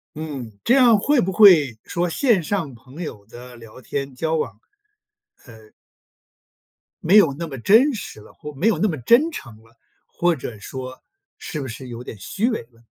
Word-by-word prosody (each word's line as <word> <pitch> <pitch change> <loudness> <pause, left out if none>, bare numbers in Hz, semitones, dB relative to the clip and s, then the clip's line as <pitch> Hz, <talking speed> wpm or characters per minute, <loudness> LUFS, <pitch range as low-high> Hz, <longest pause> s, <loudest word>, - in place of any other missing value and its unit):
嗯， 140 -7 -6
这 240 - +3
样 245 -5 +6
会 270 +6 +2
不 190 - -1
会， 165 - +6
说 175 0 -2
线 225 - +2
上 165 -5 -3
朋 130 +7 -13
友 105 -9 -8
的 125 +2 -12
聊 115 +1 -14
天 135 +1 -5
交 160 +3 -2
往， 155 - -3 0.9
呃 110 -1 -17 1.3
没 185 +6 +3
有 200 -10 +6
那 170 - -4
么 135 -4 -8
真 235 - +4
实 205 - -8
了， - - -16
或 150 0 -10
没 165 +11 -1
有 225 - +2
那 215 - +1
么 155 - -3
真 255 - +3
诚 120 - -9
了， 115 +1 -25 0.3
或 175 -1 0
者 120 -5 -8
说 130 +4 -8 0.4
是 155 -3 -6
不 135 - -5
是 125 +2 -9
有 120 0 -8
点 115 - -9
虚 200 - -2
伪 - - -3
呢？ 115 - -24
150 Hz, 200 characters per minute, -21 LUFS, 120-200 Hz, 1.3 s, 样